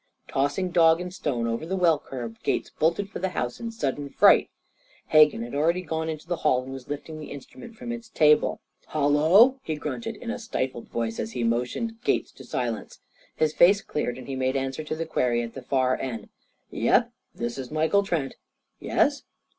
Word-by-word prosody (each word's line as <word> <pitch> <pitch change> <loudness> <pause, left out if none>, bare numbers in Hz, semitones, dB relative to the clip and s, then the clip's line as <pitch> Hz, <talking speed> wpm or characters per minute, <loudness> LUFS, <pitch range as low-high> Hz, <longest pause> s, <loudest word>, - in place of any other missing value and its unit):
Tossing 145 +7 0
dog 165 -1 +5
and 180 0 -6
stone 130 -10 -2
over 115 +4 -2
the 180 +4 -2
well 170 -4 +4
curb, 120 -4 -7
Gates - - -1
bolted 170 +5 0
for - - -5
the 190 +1 -1
house 125 0 -2
in 230 - -4
sudden 145 - -3
fright. - - +5 0.6
Hegan 150 -6 +5
had 120 - -8
already 165 +5 +1
gone 160 -1 -2
into 155 0 -6
the 175 -1 -1
hall, 130 -5 +2
and 130 - -9
was 135 -2 -9
lifting 155 +2 -6
the 150 - -8
instrument 225 - -10
from 235 +2 -6
its 235 -1 -7
table. 150 -7 +3 0.3
"Hallo!" 160 - +5
he 160 - -3
grunted 225 +9 -4
in 235 +2 -5
a 245 - -4
stifled 130 - -3
voice 115 -1 -3
as 110 - -4
he 120 - -2
motioned 125 - -1
Gates - - 0
to - - -13
silence. 120 -3 -4 0.4
His 155 -1 +1
face 195 +5 +5
cleared, 140 - -3
and 130 - -9
he 135 - -4
made 130 0 0
answer 135 +2 -2
to 155 - -3
the 165 +1 -3
query 120 -6 +1
at 115 - -7
the 135 - -7
far 130 0 +1
end: 115 -5 -5 0.4
"Yep, - - +2 0.2
this 120 +2 -4
is 130 -2 -6
Michael 160 +6 +2
Trent. 170 -9 -2 0.4
Yes? - - +1
150 Hz, 195 wpm, -26 LUFS, 130-180 Hz, 0.6 s, dog